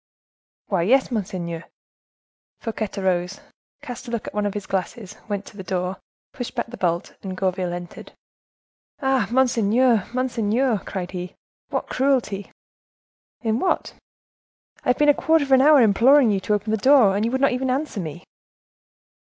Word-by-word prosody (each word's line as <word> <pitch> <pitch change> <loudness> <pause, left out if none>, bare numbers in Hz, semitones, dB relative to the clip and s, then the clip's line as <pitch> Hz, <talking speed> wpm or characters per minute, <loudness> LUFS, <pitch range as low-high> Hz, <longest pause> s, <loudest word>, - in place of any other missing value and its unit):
"Why, 190 -4 0
yes, 260 +9 +3
monseigneur." 180 -6 -4 0.9
Fouquet 220 -2 -3
arose, 185 0 -1 0.4
cast 245 +1 -8
a - - -6
look 235 -2 -3
at - - -7
one 210 0 0
of 205 - -5
his 205 - -4
glasses, 195 +1 -4
went 205 -1 -3
to - - -13
the - - -6
door, 180 +1 -2 0.4
pushed 245 - -6
back - - -1
the 245 +1 -10
bolt, 170 -1 -1
and 190 -1 -6
Gourville 185 -2 -1
entered. 175 0 -8 0.9
"Ah! 265 -6 +2
monseigneur! 240 -2 +3
monseigneur!" 245 -2 0
cried 185 -2 -5
he, 180 -1 -6 0.3
"what - - -2
cruelty!" 255 -7 0 0.9
"In 225 0 0
what?" 370 - -1 0.9
"I - - -1
have 250 - +3
been 295 - +3
a 290 - +7
quarter 320 +1 +2
of 275 - -8
an 260 -1 +7
hour 295 +1 +7
imploring 240 +3 +5
you 195 - +1
to 210 +2 0
open 210 +1 -3
the 220 - +2
door, 245 -4 +5
and 205 - 0
you 230 - +1
would 260 +2 -1
not 275 - +4
even 255 +1 -1
answer 265 -3 -2
me." 170 0 -6
215 Hz, 165 wpm, -23 LUFS, 190-255 Hz, 0.9 s, a